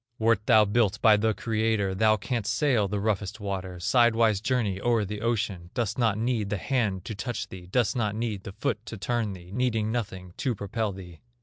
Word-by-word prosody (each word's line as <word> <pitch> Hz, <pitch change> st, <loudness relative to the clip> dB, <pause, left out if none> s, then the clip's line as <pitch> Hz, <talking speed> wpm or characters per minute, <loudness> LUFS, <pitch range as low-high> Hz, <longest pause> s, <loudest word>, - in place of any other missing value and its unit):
Wert 110 Hz, -2 st, +2 dB
thou 110 Hz, -4 st, +6 dB
built 105 Hz, -1 st, +1 dB
by 110 Hz, -2 st, +6 dB
the 110 Hz, +1 st, +1 dB
Creator, 110 Hz, -3 st, 0 dB
Thou 110 Hz, +2 st, +3 dB
canst 115 Hz, 0 st, -2 dB
sail 125 Hz, -9 st, +2 dB
the 100 Hz, +1 st, -2 dB
roughest 100 Hz, 0 st, -1 dB
waters, 95 Hz, -3 st, -4 dB
Sidewise 115 Hz, -4 st, +4 dB
journey 110 Hz, -5 st, 0 dB
o'er 115 Hz, -3 st, +2 dB
the 105 Hz, +1 st, -5 dB
ocean; 105 Hz, -7 st, -1 dB
Dost 115 Hz, -2 st, -1 dB
not 110 Hz, -4 st, +2 dB
need 115 Hz, -3 st, -1 dB
the 105 Hz, -, -1 dB
hand 105 Hz, -6 st, -1 dB
to 110 Hz, -, -4 dB
touch 120 Hz, +4 st, -4 dB
thee, 90 Hz, -1 st, -10 dB
Dost 110 Hz, +2 st, +1 dB
not 105 Hz, -4 st, 0 dB
need 110 Hz, -3 st, -2 dB
the 100 Hz, -, -8 dB
foot 105 Hz, +2 st, -2 dB
to 110 Hz, -, -6 dB
turn 115 Hz, 0 st, -1 dB
thee, 90 Hz, -1 st, -12 dB
Needing 115 Hz, -3 st, 0 dB
nothing 95 Hz, -6 st, -4 dB
to 130 Hz, -5 st, -1 dB
propel 105 Hz, +2 st, -2 dB
thee." 90 Hz, -4 st, -10 dB
110 Hz, 200 wpm, -27 LUFS, 100-115 Hz, -, thou